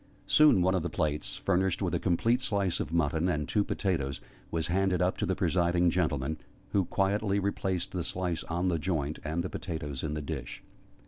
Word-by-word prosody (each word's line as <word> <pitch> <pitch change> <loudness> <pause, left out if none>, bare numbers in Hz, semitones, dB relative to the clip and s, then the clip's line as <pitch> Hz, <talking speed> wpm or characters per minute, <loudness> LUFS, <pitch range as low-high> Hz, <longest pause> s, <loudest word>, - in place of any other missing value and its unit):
Soon 150 -12 +6
one 95 +1 +3
of 95 - +1
the 85 - -2
plates, 75 -7 -1
furnished 95 -1 +1
with - - -1
a - - +1
complete 115 +8 +2
slice 100 -6 0
of - - -3
mutton 85 +1 +1
and 75 -4 -1
two 105 - +2
potatoes, 75 -11 -1 0.3
was 80 -1 -1
handed 90 +1 +1
up 90 +1 +2
to - - -1
the - - +1
presiding 85 -1 +2
gentleman, 80 -4 0 0.3
who 100 -3 +2
quietly 100 +2 +1
replaced 95 -2 -1
the 90 -2 -2
slice 90 -1 -2
on 85 +2 -1
the 85 -2 0
joint, 75 -3 -2
and 80 +3 -1
the - - -2
potatoes 75 -6 -4
in 75 -1 -3
the 75 - -3
dish. 70 -5 -6
85 Hz, 195 wpm, -30 LUFS, 80-95 Hz, 0.3 s, Soon